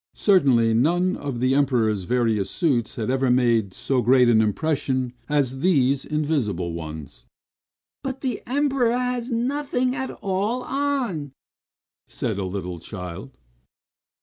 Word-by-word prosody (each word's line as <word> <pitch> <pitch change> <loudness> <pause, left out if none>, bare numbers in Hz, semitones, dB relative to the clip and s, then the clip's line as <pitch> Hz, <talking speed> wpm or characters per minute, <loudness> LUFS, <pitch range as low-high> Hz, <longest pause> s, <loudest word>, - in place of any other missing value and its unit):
Certainly, 130 - +4
none 175 +10 +2
of 140 -4 -5
the 130 +2 +2
Emperor's 115 -8 +1
various 115 -3 +1
suits, 130 -10 0
had 115 +1 -2
ever 135 0 +1
made 120 -5 +2
so 130 +6 -1
great 125 +1 +5
an 110 -2 +5
impression, 130 +2 -1 0.2
as 135 -3 0
these 140 -5 +2
invisible 135 - -1
ones. 80 -3 -8 0.8
"But 270 0 -4
the 255 -5 -2
Emperor 265 -2 +1
has 250 -1 -2
nothing 255 +1 -1
at 265 -1 -3
all 205 +6 -1
on!" 260 - -2 0.7
said - - -3
a 95 - -2
little 90 -2 -5
child. 90 - -7
135 Hz, 125 wpm, -23 LUFS, -, 0.8 s, great